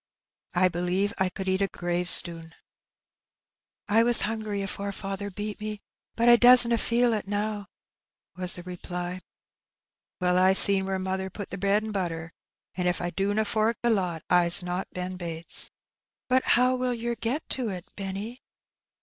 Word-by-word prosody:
I 185 Hz, +1 st, +4 dB
believe 180 Hz, +3 st, -1 dB
I 190 Hz, -1 st, +1 dB
could 190 Hz, +1 st, -7 dB
eat 190 Hz, +1 st, 0 dB
a 195 Hz, -, +2 dB
gravestnn." 175 Hz, -2 st, +1 dB, 1.3 s
"I 215 Hz, +2 st, +3 dB
was 240 Hz, 0 st, +5 dB
hungry 215 Hz, -2 st, -3 dB
afore 200 Hz, +1 st, -4 dB
faather 195 Hz, +1 st, -6 dB
beat 210 Hz, +2 st, -7 dB
me, 210 Hz, -1 st, -6 dB, 0.3 s
but 235 Hz, +1 st, +1 dB
I 240 Hz, 0 st, +7 dB
doesna 240 Hz, -1 st, +7 dB
feel 235 Hz, +1 st, +1 dB
ib 210 Hz, -3 st, -3 dB
now," 205 Hz, 0 st, -3 dB, 0.7 s
was 180 Hz, 0 st, +1 dB
tiie 175 Hz, -, -11 dB
reply. 180 Hz, 0 st, -6 dB
Hbb -, -, -7 dB
Beknt. -, -, -14 dB, 1.0 s
"Well, 180 Hz, 0 st, +2 dB
I 185 Hz, +1 st, +4 dB
seen 195 Hz, 0 st, +7 dB
where 190 Hz, 0 st, -2 dB
mother 190 Hz, 0 st, -3 dB
pat 200 Hz, +1 st, -9 dB
the 195 Hz, -, -5 dB
hread 200 Hz, +2 st, +1 dB
mi' 220 Hz, -, -5 dB
butter, 170 Hz, -4 st, -4 dB, 0.4 s
and 180 Hz, -1 st, -2 dB
if 180 Hz, -, 0 dB
I 175 Hz, 0 st, -3 dB
dutma 205 Hz, +3 st, -1 dB
fork 215 Hz, +2 st, 0 dB
the 235 Hz, -, +3 dB
lot, 180 Hz, -6 st, -2 dB
I'b 175 Hz, 0 st, +3 dB
not 180 Hz, +2 st, -4 dB
Ben 180 Hz, 0 st, -6 dB
Bates." 170 Hz, -2 st, -3 dB, 0.6 s
"Bat 255 Hz, +1 st, +2 dB
how 250 Hz, +1 st, +2 dB
will 250 Hz, -1 st, -2 dB
yer 235 Hz, +1 st, -3 dB
get 235 Hz, +7 st, -4 dB
to 250 Hz, -4 st, -1 dB
it, 180 Hz, -3 st, -7 dB
Benny?" 200 Hz, +5 st, -6 dB
195 Hz, 170 wpm, -26 LUFS, 180-220 Hz, 1.3 s, I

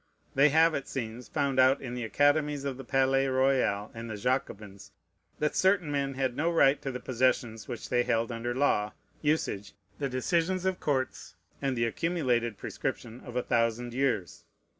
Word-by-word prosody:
They 140 Hz, +2 st, +5 dB
have, 160 Hz, +3 st, +4 dB
it 135 Hz, -, -3 dB
seems, 120 Hz, -1 st, -5 dB
found 140 Hz, -3 st, 0 dB
out 130 Hz, +2 st, +5 dB
in 125 Hz, -2 st, -6 dB
the 125 Hz, -1 st, -4 dB
academies 145 Hz, +4 st, +2 dB
of 135 Hz, -2 st, -3 dB
the 135 Hz, -, -8 dB
Palais 135 Hz, +1 st, +2 dB
Royal 130 Hz, -6 st, +1 dB
and 115 Hz, 0 st, -7 dB
the 110 Hz, -, -5 dB
Jacobins, 105 Hz, -4 st, -3 dB, 0.5 s
that 150 Hz, 0 st, -1 dB
certain 185 Hz, -5 st, +2 dB
men 140 Hz, -1 st, -1 dB
had 130 Hz, -2 st, -1 dB
no 165 Hz, +5 st, +1 dB
right 145 Hz, -4 st, +4 dB
to 135 Hz, -, -3 dB
the 125 Hz, -, -5 dB
possessions 120 Hz, -4 st, 0 dB
which 120 Hz, -3 st, -6 dB
they 125 Hz, -1 st, +3 dB
held 115 Hz, 0 st, 0 dB
under 120 Hz, +1 st, -3 dB
law, 105 Hz, -6 st, +1 dB, 0.3 s
usage, 145 Hz, -10 st, -1 dB, 0.3 s
the 140 Hz, -2 st, -1 dB
decisions 170 Hz, +8 st, 0 dB
of 190 Hz, -1 st, 0 dB
courts, 130 Hz, -3 st, -2 dB, 0.3 s
and 135 Hz, -2 st, -1 dB
the 115 Hz, -, +2 dB
accumulated 120 Hz, -, 0 dB
prescription 120 Hz, +1 st, -5 dB
of 125 Hz, -, -9 dB
a 125 Hz, -, 0 dB
thousand 115 Hz, 0 st, 0 dB
years. 120 Hz, -, -1 dB
130 Hz, 175 wpm, -29 LUFS, 115-140 Hz, 0.5 s, They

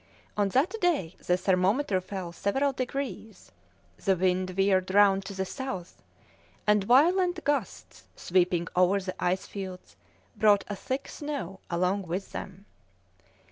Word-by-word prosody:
On 205 Hz, -1 st, +1 dB
that 270 Hz, -, +2 dB
day 295 Hz, -, +1 dB
the 180 Hz, -, +3 dB
thermometer 190 Hz, +3 st, +1 dB
fell 185 Hz, -2 st, -6 dB
several 270 Hz, +11 st, 0 dB
degrees; 255 Hz, -3 st, -5 dB, 0.5 s
the 195 Hz, -2 st, +3 dB
wind 185 Hz, +1 st, +1 dB
veered 190 Hz, 0 st, +2 dB
round 195 Hz, -1 st, +5 dB
to 200 Hz, -, -7 dB
the 190 Hz, 0 st, -2 dB
south, 190 Hz, -7 st, -6 dB, 0.6 s
and 210 Hz, -1 st, +4 dB
violent 345 Hz, -, +4 dB
gusts, 285 Hz, -9 st, -3 dB
sweeping 175 Hz, -1 st, +1 dB
over 185 Hz, +2 st, +4 dB
the 185 Hz, -1 st, -6 dB
ice 185 Hz, +1 st, 0 dB
fields, 190 Hz, -2 st, -8 dB, 0.4 s
brought 205 Hz, -2 st, +4 dB
a 205 Hz, -, -4 dB
thick 260 Hz, +7 st, -4 dB
snow 275 Hz, -, -5 dB
along 180 Hz, +2 st, 0 dB
with 185 Hz, +4 st, -4 dB
them. 190 Hz, +1 st, -8 dB
195 Hz, 135 wpm, -28 LUFS, 185-255 Hz, 0.6 s, round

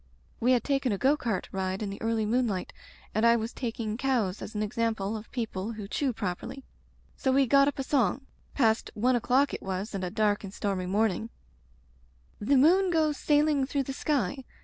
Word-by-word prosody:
We 250 Hz, +3 st, +3 dB
had 245 Hz, -, +2 dB
taken 275 Hz, -3 st, 0 dB
a 200 Hz, -, 0 dB
go 275 Hz, +8 st, +3 dB
cart 230 Hz, -, -2 dB
ride 190 Hz, +1 st, -2 dB
in 200 Hz, -, -3 dB
the 200 Hz, -, -8 dB
early 225 Hz, -1 st, 0 dB
moonlight 220 Hz, -4 st, 0 dB, 0.4 s
and 215 Hz, -, 0 dB
I 235 Hz, 0 st, +6 dB
was 225 Hz, 0 st, -3 dB
taking 225 Hz, -3 st, -3 dB
cows 240 Hz, -8 st, 0 dB
as 220 Hz, -, -7 dB
an 210 Hz, -, 0 dB
example 220 Hz, -1 st, -1 dB
of 220 Hz, +1 st, -8 dB
people 225 Hz, -3 st, -3 dB
who 210 Hz, -2 st, -7 dB
chew 270 Hz, +5 st, 0 dB
properly. 230 Hz, +5 st, -5 dB, 0.5 s
So 265 Hz, -, 0 dB
we 270 Hz, +1 st, +4 dB
got 275 Hz, +3 st, +5 dB
up 285 Hz, -, -1 dB
a 270 Hz, -, -2 dB
song 265 Hz, -1 st, +1 dB
— -, -, -35 dB
(past 225 Hz, -4 st, +2 dB
one 245 Hz, +4 st, +2 dB
o'clock 255 Hz, +4 st, +2 dB
it -, -, -4 dB
was 195 Hz, +3 st, -4 dB
and 195 Hz, -1 st, -3 dB
a 180 Hz, -, -1 dB
dark 210 Hz, +1 st, +1 dB
and 195 Hz, -, -7 dB
stormy 195 Hz, -2 st, -2 dB
morning) 215 Hz, +2 st, 0 dB, 1.1 s
The 270 Hz, +7 st, +3 dB
moon 360 Hz, +8 st, +5 dB
goes 310 Hz, -4 st, +1 dB
sailing 295 Hz, -2 st, +2 dB
through 280 Hz, 0 st, 0 dB
the 270 Hz, -, -5 dB
sky. 265 Hz, -3 st, -1 dB
230 Hz, 200 wpm, -28 LUFS, 205-270 Hz, 1.1 s, I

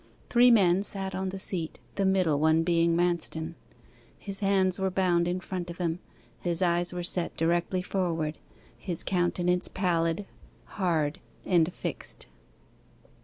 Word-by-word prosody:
Three 245 Hz, +1 st, +6 dB
men 195 Hz, -5 st, +5 dB
sat 195 Hz, -2 st, -1 dB
on 190 Hz, 0 st, -2 dB
the 190 Hz, -, -5 dB
seat, 180 Hz, -4 st, -2 dB
the 195 Hz, -1 st, +1 dB
middle 180 Hz, -6 st, +2 dB
one 160 Hz, +1 st, +3 dB
being 170 Hz, 0 st, +2 dB
Manston. 170 Hz, -2 st, 0 dB, 0.6 s
His 195 Hz, -1 st, -6 dB
hands 195 Hz, -2 st, +2 dB
were 190 Hz, 0 st, +1 dB
bound 180 Hz, -2 st, +2 dB
in 180 Hz, +1 st, -1 dB
front 180 Hz, -1 st, -5 dB
of 170 Hz, -, -7 dB
him, 170 Hz, -1 st, -1 dB, 0.4 s
his 175 Hz, 0 st, +1 dB
eyes 175 Hz, 0 st, +1 dB
were 180 Hz, -1 st, -4 dB
set 175 Hz, 0 st, +1 dB
directly 175 Hz, +2 st, 0 dB
forward, 165 Hz, -5 st, -2 dB, 0.4 s
his 175 Hz, -4 st, -5 dB
countenance 180 Hz, 0 st, +1 dB
pallid, 170 Hz, 0 st, 0 dB, 0.4 s
hard, 160 Hz, -6 st, -1 dB, 0.3 s
and 175 Hz, -2 st, +3 dB
fixed. -, -, -5 dB
175 Hz, 140 wpm, -28 LUFS, 170-190 Hz, 0.6 s, Three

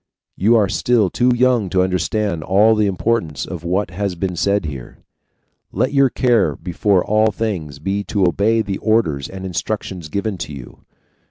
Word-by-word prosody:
You 110 Hz, +5 st, +3 dB
are 105 Hz, -3 st, +4 dB
still 110 Hz, -1 st, +1 dB
too 125 Hz, +1 st, +2 dB
young 120 Hz, -5 st, +2 dB
to 90 Hz, +1 st, +2 dB
understand 95 Hz, -1 st, -1 dB
all 105 Hz, +6 st, +4 dB
the 105 Hz, -1 st, +2 dB
importance 95 Hz, -6 st, -1 dB
of 90 Hz, -4 st, -7 dB
what 90 Hz, +2 st, -1 dB
has 100 Hz, +1 st, -3 dB
been 90 Hz, 0 st, -3 dB
said 100 Hz, +2 st, 0 dB
here; 70 Hz, -5 st, -7 dB, 0.7 s
let -, -, -1 dB
your 140 Hz, -1 st, +4 dB
care 120 Hz, -5 st, +2 dB
before 95 Hz, +1 st, 0 dB
all 110 Hz, +1 st, +2 dB
things 90 Hz, -10 st, -4 dB
be 95 Hz, +7 st, -2 dB
to 100 Hz, -4 st, +1 dB
obey 110 Hz, +6 st, +1 dB
the 100 Hz, -2 st, -4 dB
orders 110 Hz, -12 st, 0 dB
and 95 Hz, 0 st, -8 dB
instructions 95 Hz, -3 st, -4 dB
given 100 Hz, +1 st, -3 dB
you. 70 Hz, -4 st, -11 dB
100 Hz, 165 wpm, -19 LUFS, 90-110 Hz, 0.7 s, are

